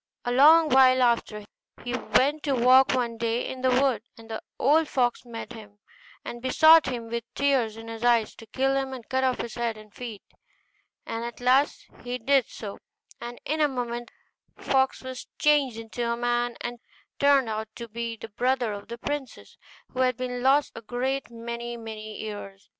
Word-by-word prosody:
A 245 - 0
long 310 +5 +7
while 255 -1 +6
after, 230 -3 0 0.4
he 245 - -4
went 285 +4 +1
to 280 -3 0
walk 255 +2 +5
one 235 -2 -1
day 230 +1 -1
in 260 - -6
the 260 - +2
wood, 260 0 +2 0.2
and 225 0 -13
the 220 - -4 0.2
old 305 +4 +3
fox 245 -4 0
met 235 0 -8
him, 210 -3 -12 0.5
and 240 - -7
besought 315 +4 +6
him 240 -3 -4
with 235 0 -2
tears 260 -6 +1
in 225 0 -10
his 225 0 -7
eyes 235 -3 +3
to 225 - -12
kill 270 +4 0
him, 270 -1 -2
and 250 -3 -9
cut 260 0 0
off 255 -1 +1
his 235 - -5
head 235 -2 -2
and 215 -1 -15
feet. 230 -5 -8 0.8
And 230 0 -4
at 235 0 -6
last 260 +4 +2 0.2
he 245 0 -3
did 265 +1 +2
so, 200 -2 -8 0.4
and 240 0 -8
in 310 +1 -1
a 300 - +5
moment 240 -3 -4 0.5
the - - -16
fox 265 -1 +1
was 260 -1 -7
changed 285 -6 +3
into 235 +1 -3
a 235 - -1
man, 240 0 0
and 240 0 -5 0.4
turned 280 -3 +4
out 220 0 -3
to 235 - -7
be 230 +1 -5
the 225 - -9
brother 245 0 0
of 200 0 -8
the 235 - -7
princess, 285 0 -6 0.4
who 255 - -7
had 255 -2 +2
been 250 -1 -4
lost 275 +3 +3
a - - -8
great 250 +4 -2
many 235 0 -6
many 215 -1 -8
years. 205 -2 -8
245 Hz, 190 wpm, -26 LUFS, 230-265 Hz, 0.8 s, long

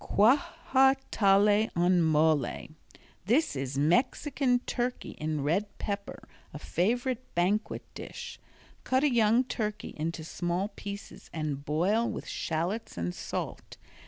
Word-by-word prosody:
Quajatale 250 - +4
En 175 +1 +4
Mole 155 -4 +2 0.6
This 285 - +2
is 135 0 -3
Mexican 250 - +2
Turkey 245 0 -2
in 155 -2 -3
Red 195 +8 -1
Pepper, 200 -1 -5 0.2
a - - -7
favorite 240 - -1
banquet 190 +5 0
dish. - - -8 0.4
Cut 260 +2 +1
a 290 -4 +3
young 230 +1 +4
turkey 215 -4 -4
into 160 +1 -3
small 175 +4 -2
pieces 200 -2 -9
and 150 -3 -3
boil 185 +11 +1
with - - -5
shallots 170 - -3
and 85 +1 -2
salt. - - -5
200 Hz, 115 wpm, -29 LUFS, 160-245 Hz, 0.6 s, Quajatale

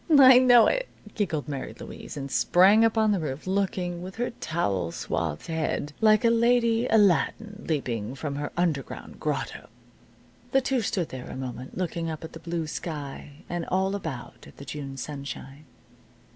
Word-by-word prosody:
"I 260 -2 +9
know 245 -3 +7
it," - - +1 0.3
giggled 170 -9 -2
Mary 140 -3 -5
Louise, - - -9
and 140 -1 -5
sprang 195 - +5
up 225 0 +2
on 220 -1 +4
the 200 - +1
roof, 145 -2 -4
looking, 185 -2 -1
with 185 +1 -8
her 240 +1 -2
towel 100 - -2
swathed 80 -3 -3
head, 155 -2 -2
like 215 0 +5
a 230 - +5
lady 235 0 +3
Aladdin 210 0 +2
leaping 125 -6 -2
from 140 0 -4
her 145 - -3
underground 160 -7 -2
grotto. - - -3 0.8
The 270 - +5
two 260 -1 0
stood 185 -5 -1
there 130 -1 -7
a - - -7
moment, 130 -1 -6
looking 170 -2 -2
up 160 0 -6
at 160 - -8
the 165 - -8
blue 165 0 -3
sky, 145 -2 -6
and 175 -1 -3
all 190 +1 +1
about 160 -11 -6
at - - -16
the 140 - -10
June 140 -1 -6
sunshine. 140 +1 -7
170 Hz, 170 wpm, -26 LUFS, 140-215 Hz, 0.8 s, I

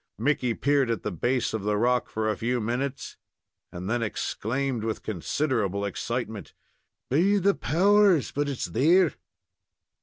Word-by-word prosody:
Mickey 125 -5 0
peered 140 -3 +2
at 115 -4 -2
the 105 - -2
base 120 +9 -1
of 110 - -2
the 105 +1 0
rock 125 +3 +1
for 110 0 -2
a 110 - +1
few 120 +5 -1
minutes, 125 +4 -3 0.5
and 90 +1 -6
then 120 +3 0
exclaimed, 120 +3 -2
with 110 -1 -3
considerable 100 - -1
excitement: 110 0 -4 0.6
"Be 185 +9 +3
the 200 +1 +3
powers! 195 -1 +3
but 145 0 -1
it's 135 - -3
there!" 165 +8 +3
125 Hz, 145 wpm, -26 LUFS, 110-145 Hz, 0.6 s, Be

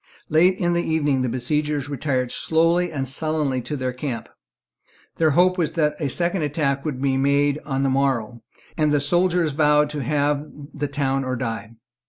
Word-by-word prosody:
Late 180 +4 +4
in 175 -2 +1
the 170 - +1
evening 150 -5 0
the 130 - 0
besiegers 145 +3 -1
retired 130 -3 -2
slowly 165 +2 +1
and 135 -3 -3
sullenly 145 -1 -1
to 150 - -5
their 130 -1 -2
camp. 125 -2 -5 0.9
Their 160 -1 +3
hope 185 +1 +4
was 165 - 0
that 150 -3 +1
a 145 -4 -1
second 175 +5 -1
attack 140 -2 -1
would 145 -5 -3
be 135 -1 +1
made 140 +1 +2
on 135 -1 -1
the 135 - +2
morrow; 125 -4 0 0.3
and 155 -2 +1
the 145 - +3
soldiers 175 +2 +2
vowed 150 0 +3
to 150 -1 -4
have 145 +2 0 0.3
the 145 -1 -3
town 135 -1 -1
or 130 -1 -2
die. 115 -2 -4
145 Hz, 180 wpm, -22 LUFS, 135-155 Hz, 0.9 s, Late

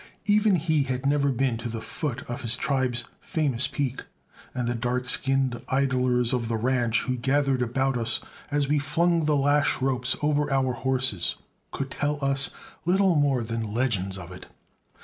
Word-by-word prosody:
Even 210 -1 +4
he 160 -2 +1
had 130 -1 -3
never 140 0 +2
been 125 -2 0
to 120 +1 -5
the 115 0 -4
foot 135 +2 -4
of 120 +3 -6
his 120 -1 +1
tribe's 125 -3 -1
famous 150 - 0
peak, 135 -2 -3 0.5
and 125 -2 -3
the 120 - 0
dark 125 +2 -2
skinned 135 -2 +2
idlers 130 -2 +1
of 120 -2 -1
the 115 0 -1
ranch 120 -1 +1
who 130 - -1
gathered 135 +1 +1
about 130 +2 0
us 115 0 +4 0.3
as 145 -1 0
we 150 +1 +2
flung 170 +3 +1
the 150 -1 +2
lash 145 +1 +2
ropes 130 -1 0
over 150 -1 +1
our 130 -2 +1
horses 130 -7 0 0.3
could 135 -2 -5
tell 145 +3 -1
us 135 -1 +3 0.3
little 190 +1 +3
more 140 -5 +2
than 110 -2 -4
legends 100 -7 0
of 90 -2 -9
it. 90 - -10
130 Hz, 170 wpm, -26 LUFS, 120-145 Hz, 0.5 s, Even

